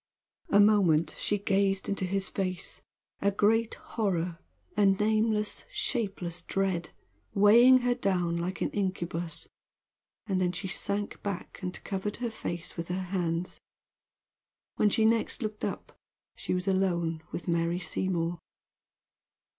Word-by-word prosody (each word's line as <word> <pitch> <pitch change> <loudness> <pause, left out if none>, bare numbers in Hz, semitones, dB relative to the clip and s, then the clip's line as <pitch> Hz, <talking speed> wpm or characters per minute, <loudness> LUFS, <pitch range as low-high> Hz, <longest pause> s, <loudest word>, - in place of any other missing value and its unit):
A 205 - +5
moment 195 -7 +4
she 205 - +1
gazed 195 -1 +1
into 195 -1 -1
his 190 +1 0
face, 185 -2 -3 0.4
a 200 - +4
great 220 +3 +2
horror 180 -6 -2 0.4
a 205 -2 +4
nameless, 215 +2 +2
shapeless 195 -7 -2
dread 190 -4 -1 0.5
weighing 235 +6 +7
her 245 0 +2
down 180 -6 0
like 175 +2 -3
an - - 0
incubus, 175 -4 -2 0.8
and 190 -3 0
then 180 -1 +1
she 190 +2 -4
sank 200 +2 -2
back 200 -3 -5
and 180 -1 -5
covered 200 +1 -3
her 235 -1 -3
face 175 -5 -5
with 170 -1 -4
her 180 +1 -2
hands. 175 -1 -1 1.2
When 210 - +4
she 220 +2 +3
next 230 +1 +1
looked 215 -1 -4
up - - -4 0.4
she - - -2
was 180 +1 -3
alone 170 -4 +1
with - - -5
Mary 170 0 +1
Seymour. 175 -2 -1
195 Hz, 130 wpm, -29 LUFS, 175-210 Hz, 1.2 s, weighing